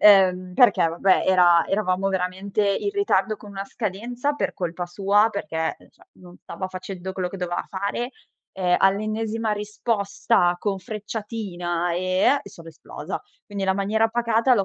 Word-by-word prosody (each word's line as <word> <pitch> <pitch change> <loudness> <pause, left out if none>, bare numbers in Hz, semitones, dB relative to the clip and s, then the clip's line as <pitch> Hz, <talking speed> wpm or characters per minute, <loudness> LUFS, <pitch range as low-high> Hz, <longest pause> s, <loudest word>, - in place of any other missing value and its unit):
ehm 185 -3 +5
perché 245 -7 +5
vabbè 185 +3 +3
era 175 -3 +5
eravamo 195 -1 +1
veramente 190 +2 -1
in 300 - 0
ritardo 405 - +1
con 205 - -12
una 195 0 -5
scadenza 235 +7 -3
per - - -1
colpa 175 -1 -3
sua, 200 +4 +3
perché, 165 -6 -3
uhm, - - -20
cioè, - - -24
non 180 -1 -15
stava 185 - -5
facendo 185 0 -6
quello 185 -1 -2
che 195 - -8
doveva 180 -2 -3
fare, 200 +6 -3 0.4
e 180 -2 +1
all'ennesima 215 +3 +1
risposta 210 -2 0
con 195 0 -1
frecciatina 200 -5 -4
eh 185 +10 +2
è, - - -11
sono 165 -2 -14
esplosa. 160 - -7 0.2
Quindi 205 -3 -5
la 190 0 +2
maniera 215 +3 +1
pacata 235 +1 +2
l'ho 200 -4 +2
195 Hz, 155 wpm, -24 LUFS, 185-215 Hz, 0.4 s, ehm